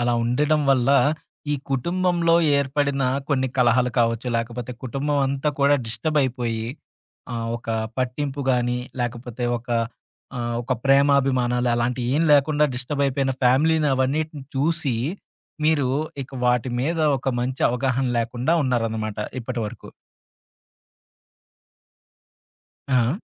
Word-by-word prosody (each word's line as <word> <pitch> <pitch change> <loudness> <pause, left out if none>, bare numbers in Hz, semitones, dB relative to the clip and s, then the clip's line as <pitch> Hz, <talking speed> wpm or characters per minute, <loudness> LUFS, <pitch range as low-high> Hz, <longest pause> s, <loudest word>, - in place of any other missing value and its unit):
అలా 120 0 +1
ఉండడం 150 +6 +2
వల్ల, 130 0 +3 0.6
ఈ - - +2 0.2
కుటుంబంలో 170 +4 +1 0.2
ఏర్పడిన 140 0 0 0.3
కొన్ని 130 -2 +1
కలహాలు 125 0 +3
కావచ్చు. 115 +1 0
లేకపోతే 120 +1 -4
కుటుంబమంతా 140 +2 0
కూడా 140 +1 +5
డిస్టర్బ్ 115 +8 -1
అయిపోయి, 120 -4 -2 0.7
ఆహ్, 115 -1 -3
ఒక 120 - -14 0.3
పట్టింపు 140 +2 -2
గాని, 125 0 0 0.2
లేకపోతే 120 0 -4
ఒక 120 - -21 0.7
ఆహ్, 120 -1 -2
ఒక 130 - -2
ప్రేమాభిమానాలు 135 -3 +3
అలాంటియేం 125 +5 0
లేకుండా 145 +1 +4
డిస్టర్బ్ 130 +3 -2
అయిపోయిన 135 0 0
ఫ్యామిలీ‌ని 150 +4 +3
అవన్నిటిని 145 +3 -1
చూసి, 145 -2 +1 0.7
మీరు 150 -4 +3 0.3
ఇక 135 - -13
వాటి 125 0 +1
మీద 165 +5 -1 0.2
ఒక 130 - -3
మంచి 130 +2 -2
అవగాహన 130 +1 0
లేకుండా 120 +5 -1
ఉన్నారన్నమాట 110 -5 -1 0.2
ఇప్పటివరకు. 115 -2 -5 3.0
ఆ! 130 +4 +2
130 Hz, 105 wpm, -23 LUFS, 120-140 Hz, 3.0 s, కూడా